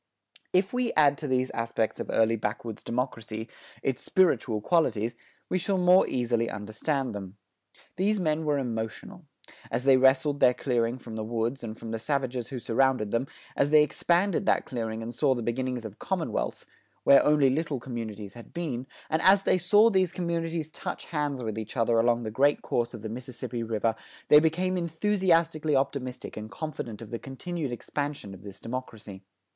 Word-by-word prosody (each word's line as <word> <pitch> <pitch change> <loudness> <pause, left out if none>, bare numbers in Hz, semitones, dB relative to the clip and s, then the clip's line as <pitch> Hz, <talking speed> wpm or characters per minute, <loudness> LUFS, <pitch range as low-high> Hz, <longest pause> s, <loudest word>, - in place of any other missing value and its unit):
If 190 +3 +2
we 250 -1 +1
add 145 -2 +4
to 150 - -4
these 130 -1 +1
aspects 115 -1 -1
of - - -5
early 115 0 +3
backwoods 110 +1 -4
democracy, 115 -2 -3 0.4
its 135 -2 -1
spiritual 155 -12 +2
qualities, 120 -5 +1 0.3
we 185 - 0
shall 195 +2 0
more 180 +1 +5
easily 120 -2 0
understand 110 +7 -2
them. 100 -1 -7 0.6
These 205 +3 +2
men 160 -2 0
were 150 -2 +1
emotional. 120 +6 -4 0.4
As 125 - -1
they 135 -1 +6
wrested 135 +2 +4
their 125 -2 +5
clearing 120 -2 0
from 115 -3 -8
the 110 - -3
woods 115 +4 -2
and 110 -1 -6
from 115 - -7
the 115 - -2
savages 130 -2 -1
who 135 - -6
surrounded 125 -2 +1
them, 120 +3 0 0.3
as 140 - +2
they 150 0 +7
expanded 180 +5 +1
that - - +3
clearing 115 -2 -4
and 115 +1 -6
saw 135 +1 +2
the 120 - -3
beginnings 125 0 -2
of 105 -2 -9
commonwealths, 165 - -2 0.4
where 140 - +7
only 150 -3 +4
little 150 -1 -1
communities 110 -5 -6
had 120 +8 -13
been, 135 -7 -3 0.2
and 160 +1 0
as 195 +1 +6
they 185 - +3
saw 205 +6 +5
these 185 -3 +2
commonwealths 165 -3 -2
touch - - -6
hands 145 -5 -2
with 110 -1 -3
each 110 +3 -7
other 115 0 +3
along 120 +1 +2
the 110 - -4
great 140 +6 +2
course 120 0 -1
of 110 - -10
the 110 - -4
Mississippi 120 0 -6
River, 115 0 0 0.4
they 150 - +9
became 180 +4 +1
enthusiastically 165 -3 +1
optimistic 130 -2 -2
and 110 0 -6
confident 120 -7 -6
of 105 - -12
the 115 - -3
continued 145 +2 -5
expansion 140 -3 -4
of 95 - -12
this 100 -1 -10
democracy. 115 -5 -7
130 Hz, 175 wpm, -28 LUFS, 115-160 Hz, 0.6 s, they